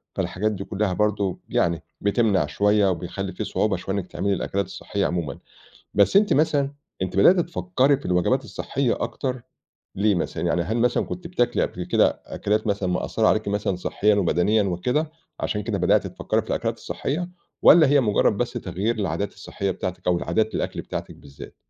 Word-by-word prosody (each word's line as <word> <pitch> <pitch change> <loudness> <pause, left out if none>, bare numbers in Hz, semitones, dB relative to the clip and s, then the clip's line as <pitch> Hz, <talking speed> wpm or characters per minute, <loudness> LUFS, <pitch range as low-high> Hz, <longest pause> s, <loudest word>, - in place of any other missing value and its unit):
فالحاجات 110 +4 -1
دي 100 -1 -5
كُلّها 100 -2 -1
برضه 105 -2 0
يعني 85 -1 +1 0.2
بتمنع 100 -5 +2
شوية، 105 +5 +2
وبيخلّي 85 -3 -4
في - - -4
صعوبة - - 0
شوية 95 - -4
إنِّك 95 -2 -3
تعملي 100 +2 -1
الأكلات 100 +1 -1
الصحية 100 -1 -3
عمومًا، 85 -6 -2 0.6
بس 105 - +4
أنتِ 205 0 +5
مثلًا، 145 -2 +2 0.3
أنتِ 95 +1 -3
بدأتِ 175 - +6
تفكّري 160 -5 +1
في 140 - -9
الوجبات 90 -1 +1
الصحية 135 -3 -2
أكتر، 125 +1 -3 0.5
ليه 100 0 +2
مثلًا؟ 85 - -3
يعني 85 +1 +1
هل 110 +7 -2
مثلًا 120 +1 +2
كنتِ 175 -1 -6
بتاكلي 125 -9 0
قبل - - -4
كده - - +2
أكلات 105 +2 -1
مثلًا 100 -2 0
مأثّرة 110 +4 0
عليكِ 110 -1 +2
مثلًا 100 -2 0
صحّيًا 105 +3 +1
وبدنيًا 100 +3 +2
وكده، 125 - -1 0.3
علشان 105 -1 -2
كده - - -2
بدأتِ - - +2
تفكّري - - -1
في - - -16
الأكلات - - -1
الصحية؟ 175 +6 -3 0.3
والَّا 160 -3 +8
هي 140 0 +4
مجرّد 105 -2 +2
بس 120 - -1
تغيير 100 +6 -2
العادات 100 -1 -2
الصحيّة 100 -1 -4
بتاعتِك 90 0 -5
أو 90 -1 +3
عادات 110 0 0
الأكل - - -2
بتاعتِك - - -6
بالذات؟ 70 -1 -12
105 Hz, 175 wpm, -24 LUFS, 95-120 Hz, 0.6 s, والَّا